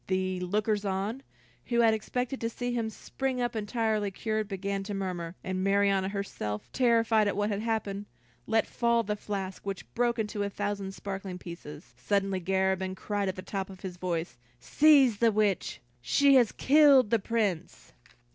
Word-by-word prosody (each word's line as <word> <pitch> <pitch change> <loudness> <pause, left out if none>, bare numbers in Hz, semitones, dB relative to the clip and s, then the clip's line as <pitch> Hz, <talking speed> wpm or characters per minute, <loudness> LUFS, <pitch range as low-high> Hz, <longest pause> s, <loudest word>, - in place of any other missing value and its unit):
The 185 -1 -1
lookers 210 +3 0
on, 200 +6 -2 0.4
who 235 -1 +2
had 225 -1 +5
expected 250 +4 -3
to 230 - 0
see 245 +1 -3
him 230 -2 -1
spring 260 +3 -4
up 240 -1 -1
entirely 215 -1 0
cured, 215 +2 -2
began 195 0 -3
to 205 0 -4
murmur, 180 -3 -4
and 185 0 -2
Marianna 195 -1 +2
herself, 195 - -4
terrified 230 -3 +3
at 200 - -1
what 205 +1 0
had 200 0 -2
happened, 210 -3 -2 0.4
let 225 0 +2
fall 235 -1 +1
the 210 0 -2
flask, 195 -2 -5
which 195 -2 -6
broke 240 0 +1
into 210 -2 -2
a 200 - 0
thousand 200 -1 -3
sparkling 195 -2 -5
pieces. 170 -3 -10
Suddenly, 195 -2 0
Garabin 190 +1 0
cried 200 0 -2
at 190 - -3
the 185 - -7
top 190 0 -4
of 190 -2 -12
his 180 -2 -6
voice, 170 -6 -3 0.2
"Seize 275 - +5
the 230 +1 +4
witch; 210 -3 0 0.2
she 275 - +4
has 245 -5 +5
killed 280 -5 +5
the 230 - +4
Prince!" 200 -6 -2
205 Hz, 170 wpm, -29 LUFS, 190-230 Hz, 0.4 s, had